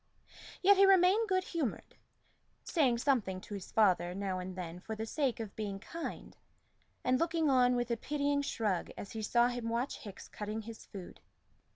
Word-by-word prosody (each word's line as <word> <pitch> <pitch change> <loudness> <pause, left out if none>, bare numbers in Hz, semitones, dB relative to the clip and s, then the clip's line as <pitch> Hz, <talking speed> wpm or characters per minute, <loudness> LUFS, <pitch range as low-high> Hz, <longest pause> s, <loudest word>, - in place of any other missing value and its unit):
Yet 400 +1 +7
he 390 0 +7
remained 390 +3 +5
good 370 -1 +2
humored, 320 - -3 0.7
saying 270 -8 +2
something 235 -8 +1
to 210 - -9
his 195 -2 -7
father 180 -5 +3
now 195 -2 -2
and 180 0 -6
then 175 -1 -6
for 220 +4 -6
the 220 +1 -4
sake 265 0 -1
of 220 -3 -6
being 205 -2 -3
kind, 330 +11 -7 0.7
and 255 0 +2
looking 330 -3 +2
on 250 -1 +4
with 240 0 -1
a 235 - +1
pitying 285 +2 0
shrug 215 -9 -1
as 200 - -7
he 220 - -5
saw 240 +3 +3
him 245 -2 -3
watch 240 +4 -2
Hickes 200 -3 -10
cutting 215 +1 -5
his 225 0 -10
food. 190 -3 -9
235 Hz, 180 wpm, -33 LUFS, 200-285 Hz, 0.7 s, Yet